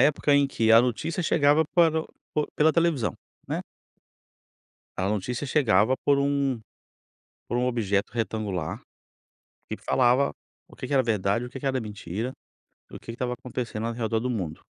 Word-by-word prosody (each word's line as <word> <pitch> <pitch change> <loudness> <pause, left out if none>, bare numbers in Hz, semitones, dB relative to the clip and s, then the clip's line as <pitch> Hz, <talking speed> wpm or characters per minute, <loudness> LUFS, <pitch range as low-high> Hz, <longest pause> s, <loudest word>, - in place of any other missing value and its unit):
época 145 +1 +3
em 140 -1 +4
que 115 -4 +1
a 115 +1 +9
notícia 140 +8 -1
chegava 150 0 +4
para 165 -2 +4
o - - -14 0.3
por 150 - 0
pela 155 +1 +4
televisão, 165 -9 +1 0.3
né. - - -2 1.4
A 95 +1 0
notícia 105 +6 -2
chegava 130 -3 +3
por 140 -1 +4
um 140 -4 0 0.9
por 120 - -1
um 125 - +1
objeto 100 -5 0
retangular, 105 -7 -3 0.9
que - - -4
falava 130 +2 +2 0.4
o - - -17
que 130 - -6
que 140 - -2
era 130 - +5
verdade, 110 0 0
o 125 - -8
que 135 - -7
que 140 - -6
era 130 -1 +1
mentira, 105 +3 -5 0.6
e - - -10
o - - -7
que - - -23
que - - -3
estava 125 0 -2
acontecendo 120 -2 -4
ao 115 - -2
redor 115 -1 -1
do 125 +2 -2
mundo. 90 -10 -3
125 Hz, 175 wpm, -26 LUFS, 110-140 Hz, 1.4 s, a